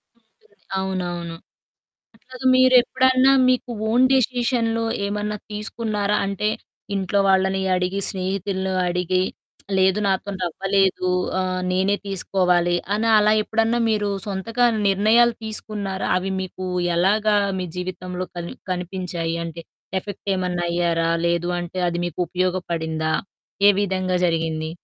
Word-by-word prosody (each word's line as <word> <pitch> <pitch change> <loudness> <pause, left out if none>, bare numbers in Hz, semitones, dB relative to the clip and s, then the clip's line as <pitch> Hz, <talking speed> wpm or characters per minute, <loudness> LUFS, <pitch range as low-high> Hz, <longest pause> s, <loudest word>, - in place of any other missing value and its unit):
ఉంటుంది. 235 - -33 0.2
అవునవును. 175 -3 -3 0.8
అట్లాగా 255 +3 -8
మీరెప్పుడన్నా 255 +1 +5 0.2
మీకు 255 0 +1 0.2
ఓన్ 245 +3 +4
డెసిషన్‌లో 240 -2 +1 0.2
ఏమన్నా 210 +1 -2 0.2
తీసుకున్నారా? 210 -1 -2
అంటే, 200 +2 -1 0.5
ఇంట్లో 195 0 0
వాళ్ళని 190 0 +2
అడిగి, 180 +2 -1
స్నేహితులను 190 0 -2 0.2
అడిగి, 180 +1 0 0.6
లేదు 190 +1 +3
నాతోని 190 0 -1
అవ్వలేదు. 190 +1 +1 0.3
ఆహ్, 185 0 -1
నేనే 190 +2 +2
తీసుకోవాలి, 180 -2 +1 0.2
అని 225 +2 0
అలా 210 0 +4
ఎప్పుడన్నా 225 +2 +1
మీరు 210 -1 0 0.2
సొంతంగా 225 +5 0 0.2
నిర్ణయాలు 220 +4 +4
తీసుకున్నారా? 210 -3 -4
అవి 190 +1 -2
మీకు 185 0 -6 0.3
ఎలాగా 210 +4 +3 0.2
మీ 180 - -3
జీవితంలో 180 0 -5
కని 170 0 -5 0.2
కనిపించాయి? 180 -2 -3
అంటే, 165 0 -7 0.4
ఎఫెక్ట్ 205 +1 -9
ఏమన్నయ్యారా? 175 -2 0 0.2
లేదు 170 +1 0
అంటే, 175 +1 -5
అది 175 0 -2
మీకు 175 - -7
ఉపయోగపడిందా? 170 -3 -1 0.6
ఏ - - +9
విధంగా 185 -2 -1
జరిగింది? 160 -1 -1
190 Hz, 110 wpm, -22 LUFS, 180-210 Hz, 0.8 s, ఏ